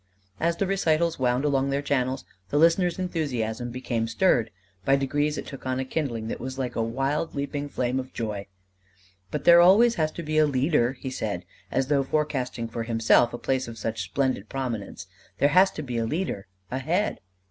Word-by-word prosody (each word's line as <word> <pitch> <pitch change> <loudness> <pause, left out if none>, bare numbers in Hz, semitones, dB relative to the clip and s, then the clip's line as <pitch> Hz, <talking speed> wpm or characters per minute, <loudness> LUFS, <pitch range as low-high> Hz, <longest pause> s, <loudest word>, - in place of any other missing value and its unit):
As 170 +1 +1
the 195 - +1
recitals 170 -4 +1
wound 125 +2 +1
along 140 -1 +2
their 140 +1 -1
channels, 130 -2 0 0.2
the 145 - 0
listener's 170 +3 +4
enthusiasm 125 -10 -2
became 120 -2 -2
stirred: 115 -2 +2 0.3
by 135 - +4
degrees 145 +2 0
it - - -5
took 135 -2 -8
on 130 0 -1
a 130 - -2
kindling 130 -6 -2
that - - -4
was 130 +1 -5
like 125 -3 -3
a - - 0
wild 135 +8 -1
leaping 145 +1 -3
flame 125 -1 -1
of 130 0 -6
joy. 105 -4 -4 0.8
"But 150 - -3
there 170 0 +8
always 210 +7 +6
has 155 0 +1
to 170 - -6
be 155 0 +1
a 155 - +5
leader," 135 -2 +2
he 130 0 -6
said, 100 -8 -3 0.2
as 135 +5 +1
though 140 0 +2
forecasting 135 -5 -1
for 115 +1 -5
himself 115 +1 +3
a - - -5
place 130 0 -1
of 115 -1 -8
such 110 +1 -3
splendid 130 -7 -1
prominence. 125 -6 -4 0.3
"There 145 - +4
has 185 +5 +6
to 155 - -5
be 125 -4 -3
a 115 - 0
leader, 115 - -3 0.2
a 130 - -1
head." 175 +10 0
135 Hz, 195 wpm, -26 LUFS, 120-155 Hz, 0.8 s, there